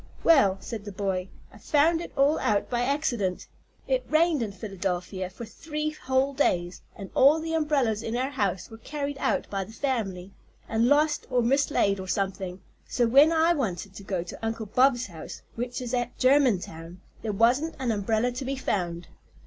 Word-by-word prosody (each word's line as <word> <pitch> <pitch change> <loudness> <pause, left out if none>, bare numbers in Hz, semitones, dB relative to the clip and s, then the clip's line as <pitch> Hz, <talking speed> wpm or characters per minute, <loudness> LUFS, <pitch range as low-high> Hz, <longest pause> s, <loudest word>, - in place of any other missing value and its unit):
"Well," 235 - +5
said 215 -1 -6
the 205 - -6
boy, 190 -1 -2 0.2
"I 210 - -14
found 320 +6 +2
it - - -7
all 280 +3 +3
out 205 +2 0
by 240 -1 +1
accident. 245 -8 -1 0.4
It - - +1
rained 315 -2 +3
in 220 -3 -2
Philadelphia 190 -2 -4
for 210 +5 -9
three 305 +6 -4
whole 265 -1 0
days, 180 -10 0
and 195 -3 -9
all 285 +4 +5
the 325 0 -4
umbrellas 280 -9 +1
in 230 +1 -3
our 260 +2 -1
house 200 -6 -2
were 225 - -10
carried 285 +2 -4
out 275 - 0
by 195 -1 -1
the 195 - -12
family, 200 -9 -2 0.4
and 225 +1 +2
lost 295 +2 +2
or 250 -2 +2
mislaid, 235 -6 +2
or 190 - -6
something, 190 -1 -2 0.3
so 245 - 0
that 230 - -1
when 285 +5 +7
I 330 +1 +4
wanted 200 - -3
to 200 - -10
go 190 -3 -2
to 180 - -10
Uncle 225 0 -2
Bob's 250 +3 +3
house, 165 -4 -9
which 245 +2 -4
is 245 0 -5
at 245 -1 -2
Germantown, 190 - +1 0.2
there 220 - -2
wasn't 245 +10 +2
an 255 -3 -1
umbrella 220 +3 0
to 250 +3 -5
be 270 +1 -2
found. 175 -9 -2
235 Hz, 185 wpm, -27 LUFS, 195-280 Hz, 0.4 s, when